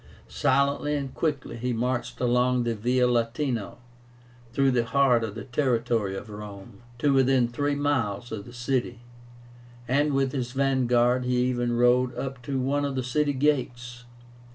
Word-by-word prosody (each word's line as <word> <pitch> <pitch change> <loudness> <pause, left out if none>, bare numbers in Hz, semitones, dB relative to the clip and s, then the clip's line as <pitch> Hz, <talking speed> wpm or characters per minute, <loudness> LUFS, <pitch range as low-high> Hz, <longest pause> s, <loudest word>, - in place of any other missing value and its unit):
Silently 140 +2 +1
and 140 -2 -4
quickly 145 -7 -2
he 125 +1 -2
marched 120 +2 -2
along 125 0 +2
the 120 -1 0
Via 125 +3 +1
Latino 120 -1 -1 0.7
through 135 +2 +2
the 120 -2 +2
heart 125 -1 +3
of 110 -2 -4
the 110 - -6
territory 120 -6 0
of - - -8
Rome, 105 0 -10 0.2
to 140 +3 +2
within 130 -2 +3
three 145 +4 -1
miles 120 -7 -1
of 105 -2 -5
the - - -11
city, 120 -1 -2 0.9
and 145 +3 +2
with 135 -1 +1
his 125 -3 -3
vanguard 125 -2 +2
he 125 0 +1
even 120 -1 0
rode 125 0 +3
up 135 0 -5
to 135 +1 -3
one 140 +3 0
of 140 -1 -2
the 130 - -1
city 145 +4 0
gates. 125 -4 -1
125 Hz, 155 wpm, -26 LUFS, 120-135 Hz, 0.9 s, heart